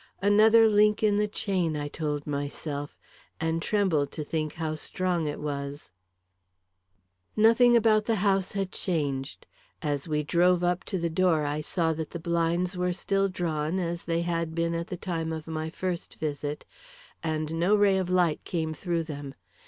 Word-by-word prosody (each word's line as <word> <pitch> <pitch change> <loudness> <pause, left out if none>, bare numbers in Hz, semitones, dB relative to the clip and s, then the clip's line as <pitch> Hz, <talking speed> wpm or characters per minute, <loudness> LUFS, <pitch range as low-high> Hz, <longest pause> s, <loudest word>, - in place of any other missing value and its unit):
Another 220 +2 +6
link 210 0 +3
in 205 -1 +3
the 210 0 +2
chain, 185 -6 -1
I 145 0 -3
told 150 -1 -3
myself; 145 0 -4 0.4
and 160 +1 -1
trembled 165 -9 +1
to 155 - -4
think 155 0 -2
how 160 -1 -3
strong 175 +1 -2
it 145 - -4
was. 140 -2 -5 1.4
Nothing 230 +2 +6
about 215 -2 +3
the 225 - +1
house 195 -2 +1
had 195 -2 -2
changed. 145 -7 -3 0.4
As 145 0 -2
we 150 -1 0
drove 175 +3 +3
up 175 +1 +1
to 190 - -2
the 170 -1 -1
door, 165 -2 +2
I 145 +1 -1
saw 160 +1 0
that 160 -1 -5
the 170 - -6
blinds 170 +2 0
were 180 0 0
still 195 +2 0
drawn, 165 -2 -2
as 170 -2 -2
they 165 0 0
had 165 -1 -2
been 170 0 0
at 170 +1 -3
the 180 - -5
time 165 -3 -3
of 160 -1 -5
my 160 0 -4
first 175 +1 -4
visit, 145 -1 -4 0.6
and 155 -1 -2
no 185 +5 +4
ray 200 -2 +4
of 185 -1 -2
light 175 -4 +2
came 160 -2 -2
through 170 +1 -2
them. 145 -3 -7
170 Hz, 170 wpm, -27 LUFS, 155-185 Hz, 1.4 s, Another